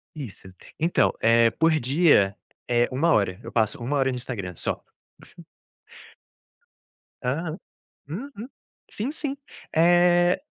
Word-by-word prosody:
Isso. 100 Hz, -9 st, -9 dB, 0.3 s
Então, 165 Hz, +2 st, +2 dB
eh, 115 Hz, 0 st, +5 dB
por 165 Hz, +7 st, +2 dB
dia 130 Hz, -, +3 dB, 0.3 s
é 120 Hz, 0 st, +2 dB
1 160 Hz, +6 st, +2 dB
hora, 100 Hz, -4 st, +1 dB
eu 115 Hz, -, -8 dB
passo 115 Hz, +4 st, 0 dB
1 140 Hz, +5 st, -1 dB
hora 135 Hz, -1 st, +2 dB
no -, -, -4 dB
Instagram 105 Hz, -8 st, -5 dB
só. -, -, -4 dB, 2.4 s
Aham, 155 Hz, +6 st, -2 dB, 0.5 s
uhum, 235 Hz, -, -7 dB, 0.4 s
sim, 230 Hz, +7 st, -3 dB
sim, 285 Hz, -3 st, -4 dB, 0.4 s
eh 175 Hz, +1 st, +4 dB
140 Hz, 115 wpm, -25 LUFS, 115-175 Hz, 2.4 s, eh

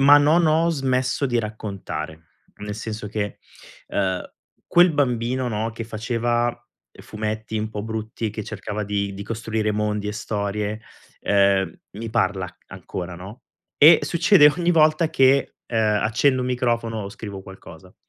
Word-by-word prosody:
ma 145 Hz, +2 st, +8 dB
non 160 Hz, +3 st, +4 dB
ho 160 Hz, +2 st, +3 dB
smesso 130 Hz, -2 st, 0 dB
di 120 Hz, -3 st, +1 dB
raccontare. 100 Hz, -8 st, -5 dB, 0.3 s
Nel 105 Hz, 0 st, -6 dB
senso 110 Hz, -1 st, -5 dB
che, 105 Hz, -1 st, -4 dB, 0.5 s
ehm, 95 Hz, -2 st, -1 dB, 0.5 s
quel 175 Hz, 0 st, +5 dB
bambino, 125 Hz, -2 st, 0 dB
no, 110 Hz, 0 st, -2 dB
che 115 Hz, 0 st, -6 dB
faceva 120 Hz, +1 st, -1 dB, 0.5 s
fumetti 110 Hz, +1 st, -4 dB
un 110 Hz, 0 st, -2 dB
po' 105 Hz, -1 st, -5 dB
brutti, 110 Hz, 0 st, -4 dB
e -, -, -2 dB
che 110 Hz, 0 st, -5 dB
cercava 105 Hz, 0 st, -5 dB
di 100 Hz, -1 st, -2 dB
di 100 Hz, -, -6 dB
costruire 110 Hz, -1 st, -2 dB
mondi 105 Hz, 0 st, -1 dB
e -, -, -2 dB
storie, 105 Hz, 0 st, -3 dB, 0.4 s
ehm, 100 Hz, -1 st, +3 dB, 0.2 s
mi 110 Hz, +2 st, -6 dB
parla 95 Hz, -3 st, 0 dB
ancora, 90 Hz, -1 st, -7 dB
no, 95 Hz, +8 st, -10 dB, 0.3 s
e 155 Hz, +2 st, +8 dB
succede 170 Hz, -3 st, +5 dB
ogni 175 Hz, 0 st, +2 dB
volta 155 Hz, 0 st, +4 dB
che, 135 Hz, 0 st, +3 dB
ehm, 110 Hz, -3 st, +1 dB
accendo 130 Hz, +4 st, +2 dB
un 125 Hz, -, -2 dB
microfono 115 Hz, -3 st, -1 dB
o 100 Hz, -, -6 dB
scrivo 100 Hz, -2 st, -8 dB
qualcosa. 95 Hz, -2 st, -13 dB
110 Hz, 150 wpm, -23 LUFS, 105-125 Hz, 0.5 s, ma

